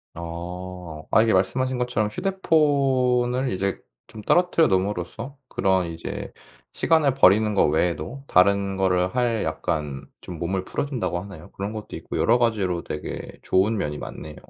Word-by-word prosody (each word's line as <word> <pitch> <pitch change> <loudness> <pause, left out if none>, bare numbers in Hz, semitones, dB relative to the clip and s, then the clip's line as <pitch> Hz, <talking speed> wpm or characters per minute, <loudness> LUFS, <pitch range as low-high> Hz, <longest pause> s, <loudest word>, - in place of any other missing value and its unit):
어 85 -1 -7
아 110 - +6
이게 115 - +2
말씀하신 125 +8 +1
것처럼 120 -4 0
휴대폰을 135 - +1
이제 95 +1 -2 0.3
좀 110 - -10
떨어뜨려 175 +5 +3
놓음으로써 100 +7 -2
그런 95 -2 +1
이제 80 0 -6 0.4
시간을 155 -5 +2
버리는 105 -3 +5
거 - - +4
외에도 90 - -1
다른 100 +1 +3
거를 90 +1 +1
할 120 -3 +1
약간 75 -4 -3 0.2
좀 90 - -8
몸을 95 +3 -2
풀어준다고 125 - -2
하나요? 90 -3 -11
그런 100 +2 -4
것도 110 -1 -7
있고 - - -6
여러 115 +2 +4
가지로 100 -8 0
되게 - - -6
좋은 100 +4 +2
면이 75 -6 -2
많네요. 75 +1 -8
100 Hz, 325 characters per minute, -24 LUFS, 90-125 Hz, 0.4 s, 아